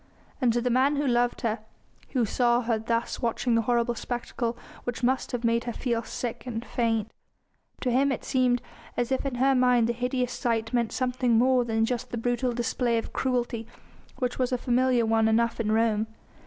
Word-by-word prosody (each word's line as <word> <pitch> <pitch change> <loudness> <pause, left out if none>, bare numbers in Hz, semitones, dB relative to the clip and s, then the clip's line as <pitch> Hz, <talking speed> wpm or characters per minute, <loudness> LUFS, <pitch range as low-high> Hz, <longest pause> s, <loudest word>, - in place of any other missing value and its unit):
And 245 -2 +4
to 240 - +1
the 245 +1 0
man 265 +4 +3
who 290 +1 0
loved 245 -1 +1
her, 225 -1 -1 0.5
and - - -30
who 250 -4 +2
saw 240 +2 +2
her 230 -2 0
thus 230 +3 -2
watching 235 0 0
the 230 - +4
horrible 240 +1 +1
spectacle 240 0 -3 0.3
which 245 0 -4
must 260 +2 +1
have 245 -2 -3
made 230 0 +1
her 240 - -3
feel 235 -2 -1
sick 235 +1 -5
and 230 -1 -4
faint, 225 -2 0 0.7
to 250 - 0
him 270 +3 +3
it 265 - -3
seemed 250 -2 +2 0.3
as 245 +1 0
if 265 +1 0
in 265 - -3
her 265 +2 +3
mind 250 -2 +4
the 235 - 0
hideous 250 +1 -1
sight 225 -2 -1
meant 235 -2 +1
something 250 -2 +1
more 255 +1 +4
than 225 -1 +1
just 250 +1 -3
the 240 - -4
brutal 245 +2 0
display 240 0 0
of 225 - -4
cruelty 240 -3 -1 0.5
which 250 -1 -2
was 255 -1 +1
a 250 - +1
familiar 245 -1 +2
one 225 0 +3
enough 230 +1 +2
in 215 -2 0
Rome. 220 -1 +2
240 Hz, 200 wpm, -27 LUFS, 230-250 Hz, 0.7 s, And